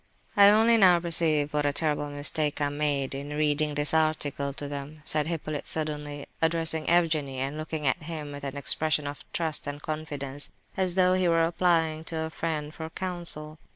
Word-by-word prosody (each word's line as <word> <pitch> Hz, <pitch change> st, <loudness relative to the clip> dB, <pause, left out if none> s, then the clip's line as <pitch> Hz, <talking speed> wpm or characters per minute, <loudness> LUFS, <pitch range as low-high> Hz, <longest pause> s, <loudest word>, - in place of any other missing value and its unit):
"I 200 Hz, 0 st, +8 dB
only 225 Hz, +2 st, +5 dB
now 180 Hz, -4 st, +6 dB
perceive 160 Hz, -3 st, +2 dB
what 150 Hz, 0 st, +1 dB
a 145 Hz, -, +2 dB
terrible 145 Hz, 0 st, -1 dB
mistake 145 Hz, +1 st, -1 dB
I 145 Hz, -1 st, +1 dB
made 145 Hz, -2 st, -1 dB
in 140 Hz, +2 st, -5 dB
reading 150 Hz, 0 st, +1 dB
this 145 Hz, +1 st, +2 dB
article 155 Hz, -3 st, 0 dB
to 145 Hz, +1 st, -6 dB
them," 145 Hz, +2 st, -7 dB
said 150 Hz, -1 st, 0 dB
Hippolyte, 155 Hz, -3 st, -4 dB
suddenly, 150 Hz, -2 st, -3 dB, 0.2 s
addressing 160 Hz, -1 st, 0 dB
Evgenie, 160 Hz, -6 st, +2 dB
and 135 Hz, +3 st, -2 dB
looking 155 Hz, -1 st, -4 dB
at 135 Hz, +6 st, +1 dB
him 155 Hz, -2 st, -6 dB
with 145 Hz, 0 st, -8 dB
an 140 Hz, 0 st, -5 dB
expression 150 Hz, +1 st, +1 dB
of 145 Hz, 0 st, -6 dB
trust 160 Hz, -3 st, -2 dB
and 145 Hz, 0 st, -4 dB
confidence, 145 Hz, -3 st, -3 dB, 0.2 s
as 185 Hz, -2 st, +1 dB
though 185 Hz, -1 st, +4 dB
he 185 Hz, -1 st, +2 dB
were 165 Hz, -1 st, +3 dB
applying 165 Hz, -2 st, +1 dB
to 160 Hz, -1 st, -3 dB
a 160 Hz, -, -3 dB
friend 155 Hz, -2 st, -3 dB
for 160 Hz, 0 st, -6 dB
counsel. 165 Hz, -4 st, -3 dB
155 Hz, 185 wpm, -27 LUFS, 145-165 Hz, 0.2 s, I